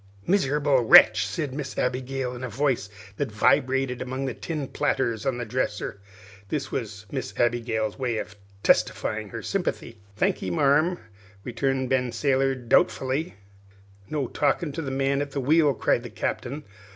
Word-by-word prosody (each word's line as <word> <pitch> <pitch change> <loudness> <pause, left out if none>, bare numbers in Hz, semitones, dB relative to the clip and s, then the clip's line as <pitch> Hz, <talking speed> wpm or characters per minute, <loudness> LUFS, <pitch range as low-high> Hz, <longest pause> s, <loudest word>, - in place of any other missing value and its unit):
"Miserable 145 -7 +2
wretch!" 110 -1 +7
said 150 -7 -3
Miss 140 0 -5
Abigail, 125 0 -2
in 125 - -8
a 130 - -3
voice 130 -5 0 0.3
that - - -2
vibrated 130 +3 +2
among 130 +2 -3
the 130 - -2
tin 155 -5 -4
platters 130 -3 -1
on 130 -2 0
the 120 - -4
dresser. 105 -4 -3 0.5
This 140 +3 -3
was 105 -4 -5
Miss 130 -2 -5
Abigail's 115 -2 0
way 120 -4 -1
of 110 - -5 0.3
testifying 105 -1 +1
her - - -7
sympathy. 175 - -3 0.2
"Thankee, 95 - 0
marm," 145 - +3 0.5
returned 130 +1 -1
Sailor 135 -1 +2
Ben, 125 -2 -12
doubtfully. 130 +10 +2 0.7
"No 150 -3 -1
talking 160 +5 0
to 165 - -4
the 140 - -4
man 135 +1 0
at 145 -1 -5
the 140 - -1
wheel," 150 +3 +4
cried 120 - +1
the 120 - -8
Captain. 130 +6 -4
130 Hz, 150 wpm, -25 LUFS, 120-140 Hz, 0.7 s, wretch